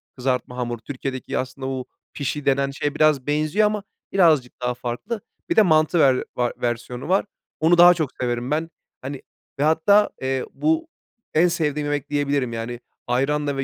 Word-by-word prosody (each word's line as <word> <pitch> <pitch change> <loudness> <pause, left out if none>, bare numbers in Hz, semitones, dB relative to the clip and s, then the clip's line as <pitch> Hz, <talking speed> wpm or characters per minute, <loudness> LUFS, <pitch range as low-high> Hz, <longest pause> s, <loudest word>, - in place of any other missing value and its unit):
kızartma 125 -1 -2
hamur. 120 -1 -2
Türkiye'deki 130 +1 -5
aslında 130 +1 -4
bu 130 -1 -3 0.3
pişi 145 0 -3
denen 140 0 +2
şeye 145 +1 -3
biraz 155 -4 +3
benziyor 155 +8 +2
ama 210 -1 -2 0.3
birazcık 155 -11 +3
daha 125 0 0
farklı. 125 - -5 0.3
Bir - - +1
de 220 - +7
mantı 160 -2 +3
ver 135 -4 +4
var 120 -1 0
versiyonu 120 +3 -3
var. 190 +2 +3 0.3
Onu 165 +2 +4
daha 175 +1 +9
çok 160 -5 -2
severim 120 +1 -2
ben. 160 +2 0 0.3
Hani, 135 +1 -6 0.4
ve - - +2
hatta, 160 +7 +4
eee, 130 0 -1
bu 320 +1 0 0.5
en 165 +3 +5
sevdiğim 150 -4 -1
yemek 145 -1 -2
diyebilirim 140 -4 0
yani 115 +1 -4 0.3
ayranla 140 +3 0
ve 135 - 0
140 Hz, 165 wpm, -23 LUFS, 125-160 Hz, 0.5 s, daha